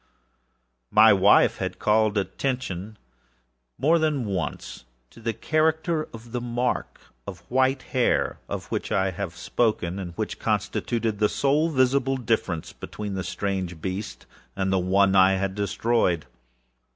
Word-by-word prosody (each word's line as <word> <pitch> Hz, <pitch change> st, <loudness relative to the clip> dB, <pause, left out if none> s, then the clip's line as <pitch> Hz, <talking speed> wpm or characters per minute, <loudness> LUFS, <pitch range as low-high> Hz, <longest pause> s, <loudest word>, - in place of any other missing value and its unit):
My 110 Hz, 0 st, +7 dB
wife 100 Hz, +1 st, +5 dB
had -, -, -4 dB
called 110 Hz, 0 st, +2 dB
my 100 Hz, -, +3 dB
attention, 110 Hz, -4 st, -4 dB, 0.8 s
more 160 Hz, +6 st, +3 dB
than 150 Hz, -6 st, 0 dB
once, 95 Hz, -9 st, -4 dB, 0.3 s
to -, -, -16 dB
the 115 Hz, 0 st, -2 dB
character 155 Hz, -, 0 dB
of 115 Hz, +1 st, -11 dB
the 125 Hz, 0 st, -3 dB
mark 120 Hz, +1 st, -2 dB, 0.3 s
of 95 Hz, -4 st, -7 dB
white 130 Hz, +1 st, +2 dB
hair, 125 Hz, -2 st, 0 dB
of -, -, -4 dB
which -, -, -3 dB
I 95 Hz, -1 st, +1 dB
have 90 Hz, -1 st, -5 dB
spoken, 100 Hz, -3 st, -1 dB
and 90 Hz, -3 st, -6 dB
which -, -, -4 dB
constituted 115 Hz, -3 st, -1 dB
the 105 Hz, -1 st, +3 dB
sole 150 Hz, +4 st, +1 dB
visible 135 Hz, -1 st, +2 dB
difference 110 Hz, -9 st, -2 dB
between 105 Hz, -1 st, -6 dB
the 95 Hz, -1 st, -3 dB
strange 95 Hz, -3 st, -3 dB
beast 95 Hz, +5 st, -5 dB, 0.3 s
and 95 Hz, -1 st, 0 dB
the 95 Hz, -, +3 dB
one 95 Hz, +2 st, +3 dB
I 95 Hz, 0 st, +6 dB
had 95 Hz, 0 st, -1 dB
destroyed. 100 Hz, -3 st, 0 dB
105 Hz, 140 wpm, -25 LUFS, 95-125 Hz, 0.8 s, My